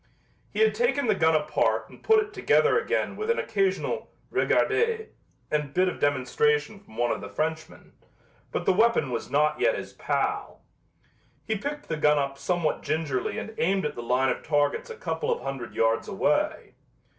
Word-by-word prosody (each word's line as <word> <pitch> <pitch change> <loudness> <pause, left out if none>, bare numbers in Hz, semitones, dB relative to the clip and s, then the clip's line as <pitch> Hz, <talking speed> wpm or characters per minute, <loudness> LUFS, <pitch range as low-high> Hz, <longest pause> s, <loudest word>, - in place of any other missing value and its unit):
He - - -2
had 440 - +5
taken 475 - +1
the 215 - +3
gun 160 -4 +3
apart 150 0 +1
and - - -16
put 440 -1 +5
it 415 - -16
together 450 +3 +3
again - - -1
with 430 +1 -4
an 470 - +2
occasional 195 -3 -1 0.2
"regardez" 445 +1 +1 0.4
and 150 -2 -1
bit 185 +1 +3
of 180 - -3
demonstration 215 - +1
from 155 - -17
one 120 0 +1
of - - -2
the 100 - -7
Frenchmen, 160 +8 -4 0.6
but - - -3
the - - +4
weapon 220 - +3
was 115 - -3
not 150 - +2
yet - - +2
his - - -7
pal. - - -2 0.8
He 220 - -1
picked 285 +8 -5
the 160 - -2
gun 150 0 +4
up 140 -1 -2
somewhat 175 -3 0
gingerly 155 -5 -2
and 220 - -5
aimed 190 +2 +1
at 150 - -2
the 120 - -6
line 125 +3 +1
of - - -2
targets 150 - 0
a 460 - -6
couple 460 +1 -2
of 470 - -1
hundred 135 -3 -5
yards 115 0 +1
away. - - 0
180 Hz, 180 wpm, -26 LUFS, -, 0.8 s, had